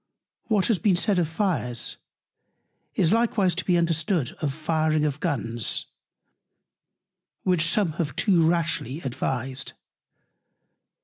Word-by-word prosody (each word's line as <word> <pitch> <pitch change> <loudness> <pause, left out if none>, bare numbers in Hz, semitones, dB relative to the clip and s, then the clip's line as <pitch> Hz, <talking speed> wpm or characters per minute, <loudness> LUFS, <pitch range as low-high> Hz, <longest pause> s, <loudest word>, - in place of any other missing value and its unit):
What 210 -4 +2
has 220 -6 +2
been 205 -4 +3
said 195 +1 +2
of 170 - +1
Fires, 160 - -1 1.0
is 170 +3 +3
likewise 220 -5 +2
to 185 +2 -2
be 180 -2 +2
understood 165 -3 +1
of 150 -3 0
firing 155 0 0
of 145 -1 -2
Guns, 120 - -1 1.6
which 175 -3 +2
some 185 0 +1
have 145 -5 -3
too 180 -5 +3
rashly 165 -4 -1
advised. 130 0 -3
165 Hz, 115 wpm, -25 LUFS, 140-185 Hz, 1.6 s, been